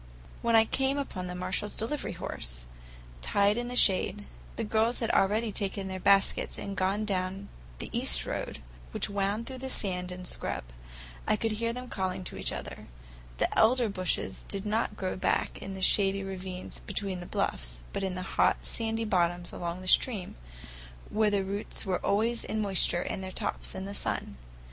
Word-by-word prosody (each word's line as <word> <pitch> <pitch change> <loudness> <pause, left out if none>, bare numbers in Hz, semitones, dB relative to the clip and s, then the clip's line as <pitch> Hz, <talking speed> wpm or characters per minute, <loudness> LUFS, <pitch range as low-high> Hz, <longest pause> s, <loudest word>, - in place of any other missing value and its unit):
When 235 -1 +3
I 225 0 +7
came 270 +4 +1
upon 190 -10 -3
the 180 - -5
Marshalls' 185 +3 -2
delivery 280 +7 -2
horse, - - -4 0.6
tied 200 - +3
in 240 +1 -2
the 250 - -4
shade, 205 -1 +4 0.3
the 230 - -2
girls 225 +2 +2
had 230 - 0
already 215 +3 +3
taken 195 0 -1
their 190 0 -4
baskets 195 +1 +4
and 200 - -4
gone 195 +3 +1
down 190 0 -2 0.3
the - - -5
east - - +2
road - - -4 0.3
which - - -1
wound 200 +3 0
through 260 0 -7
the 265 +1 -4
sand 180 -6 -2
and 180 0 -7
scrub. - - -1 0.6
I - - +4
could 225 +1 0
hear 230 +2 0
them 250 +1 -6
calling 190 -3 -2
to - - -7
each - - 0
other. - - -6 0.5
The - - +1
elder 235 +1 +5
bushes 185 -3 -1
did 195 0 -4
not 215 0 0
grow 185 -1 -2
back 185 - 0
in 195 0 -5
the 190 - -4
shady 195 0 +4
ravines 185 -1 -6
between 195 -3 -3
the 175 - -7
bluffs, - - -2 0.2
but - - -1
in 190 -1 -1
the 185 - -3
hot, - - +2
sandy 225 0 -1
bottoms 175 -3 +1
along 175 +1 -3
the 185 - -8
stream, 205 -1 +3 0.8
where 215 0 +3
their 200 -1 +1
roots 200 +3 0
were 185 -2 -1
always 225 +3 +2
in 220 - -2
moisture 190 -4 +3
and 190 - -3
their 185 - -5
tops - - -2
in 190 0 -4
the 200 - -5
sun. 65 - -3
195 Hz, 185 wpm, -30 LUFS, 185-220 Hz, 0.8 s, I